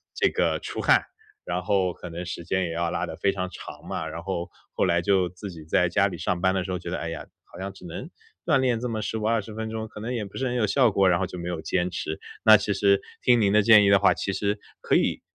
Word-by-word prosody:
这 -, -, +3 dB
个 -, -, 0 dB
出 -, -, -5 dB
汗， -, -, +4 dB, 0.4 s
然 -, -, -2 dB
后 95 Hz, -3 st, +1 dB
可 90 Hz, -, -9 dB
能 85 Hz, +2 st, -6 dB
时 85 Hz, -1 st, -6 dB
间 95 Hz, +2 st, 0 dB
也 85 Hz, -, -4 dB
要 85 Hz, 0 st, -1 dB
拉 -, -, -1 dB
得 -, -, -7 dB
非 100 Hz, -, +1 dB
常 95 Hz, -1 st, -3 dB
长 -, -, -10 dB
嘛， -, -, -3 dB
然 85 Hz, -, -6 dB
后 85 Hz, -2 st, -3 dB, 0.2 s
后 -, -, +1 dB
来 85 Hz, -1 st, +2 dB
就 95 Hz, -1 st, +2 dB
自 90 Hz, +3 st, -8 dB
己 80 Hz, -3 st, -10 dB
在 85 Hz, +3 st, +2 dB
家 100 Hz, +3 st, +3 dB
里 90 Hz, -3 st, -6 dB
上 85 Hz, +1 st, -2 dB
班 95 Hz, 0 st, +2 dB
的 95 Hz, -, 0 dB
时 95 Hz, -, -5 dB
候 90 Hz, -, -2 dB
觉 85 Hz, -, -7 dB
得： 90 Hz, -, -2 dB
“哎 85 Hz, -, -4 dB
呀， 80 Hz, -, -6 dB, 0.2 s
好 -, -, -14 dB
像 95 Hz, +1 st, -4 dB
只 95 Hz, -2 st, -14 dB
能 90 Hz, -, -7 dB, 0.4 s
锻 155 Hz, -4 st, +4 dB
炼 125 Hz, -3 st, +1 dB
这 125 Hz, +1 st, -3 dB
么 110 Hz, -1 st, -2 dB
15、 110 Hz, 0 st, -3 dB
20 110 Hz, -2 st, -1 dB
分 110 Hz, +1 st, -4 dB
钟， 110 Hz, 0 st, -4 dB
可 105 Hz, -, -11 dB
能 115 Hz, +3 st, -4 dB
也 115 Hz, -4 st, -2 dB
不 100 Hz, -, -10 dB
是 130 Hz, -, -1 dB
很 125 Hz, -, -2 dB
有 120 Hz, -3 st, +2 dB
效 125 Hz, +3 st, +4 dB
果。 95 Hz, -1 st, +3 dB
“然 85 Hz, -1 st, +3 dB
后 95 Hz, -, -1 dB
就 90 Hz, -, -8 dB
没 85 Hz, 0 st, -5 dB
有 85 Hz, -2 st, -4 dB
坚 90 Hz, +2 st, -1 dB
持。 80 Hz, -3 st, -4 dB, 0.2 s
那 110 Hz, 0 st, +9 dB
其 105 Hz, 0 st, -1 dB
实 100 Hz, 0 st, +3 dB, 0.2 s
听 120 Hz, -1 st, +4 dB
您 100 Hz, -2 st, +3 dB
的 105 Hz, -, +6 dB
建 105 Hz, -1 st, +7 dB
议 -, -, +4 dB
的 100 Hz, 0 st, +6 dB
话， 100 Hz, -, +5 dB
其 100 Hz, -, -2 dB
实 100 Hz, +1 st, -1 dB, 0.2 s
可 -, -, +1 dB
以 -, -, +1 dB
95 Hz, 300 characters per minute, -25 LUFS, 90-110 Hz, 0.4 s, 那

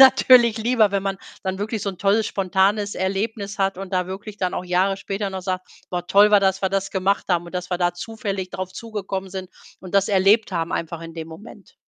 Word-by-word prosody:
natürlich 255 Hz, -3 st, +7 dB
lieber, 225 Hz, -2 st, +3 dB
wenn 200 Hz, -1 st, 0 dB
man 195 Hz, -1 st, -2 dB, 0.2 s
dann 190 Hz, 0 st, -3 dB
wirklich 215 Hz, +1 st, -3 dB
so 200 Hz, -, -1 dB
'n 185 Hz, -, -12 dB
tolles 205 Hz, +2 st, +2 dB
spontanes 195 Hz, +2 st, +1 dB
Erlebnis 200 Hz, +2 st, -2 dB
hat 195 Hz, -1 st, +1 dB
und 195 Hz, 0 st, -7 dB
da 180 Hz, -1 st, +1 dB
wirklich 200 Hz, +3 st, -7 dB
dann 185 Hz, -1 st, -1 dB
auch -, -, -3 dB
Jahre 185 Hz, +2 st, +1 dB
später 195 Hz, +1 st, -3 dB
noch 190 Hz, -1 st, -5 dB
sagt: 185 Hz, 0 st, -3 dB, 0.2 s
„Boah, 175 Hz, -1 st, -3 dB
toll 205 Hz, +3 st, +6 dB
war, 205 Hz, -, +7 dB
dass 190 Hz, 0 st, +1 dB
wir 190 Hz, -, +2 dB
das 195 Hz, 0 st, -1 dB
gemacht 195 Hz, +1 st, +1 dB
haben, 175 Hz, -2 st, +1 dB
und, 170 Hz, -, -11 dB
dass 180 Hz, 0 st, -4 dB
wir 180 Hz, -, +1 dB
da 175 Hz, 0 st, +1 dB
zufällig 200 Hz, -1 st, -5 dB
drauf 185 Hz, 0 st, -5 dB
zugekommen 195 Hz, -4 st, -5 dB
sind 185 Hz, -1 st, -6 dB, 0.3 s
und 185 Hz, 0 st, -10 dB
das 195 Hz, 0 st, +3 dB
erlebt 200 Hz, +2 st, +4 dB
haben 170 Hz, 0 st, -2 dB
einfach 165 Hz, 0 st, -3 dB
in 165 Hz, 0 st, -8 dB
dem 160 Hz, -1 st, -6 dB
Moment.“ 195 Hz, +4 st, -13 dB
195 Hz, 225 wpm, -22 LUFS, 185-205 Hz, 0.3 s, natürlich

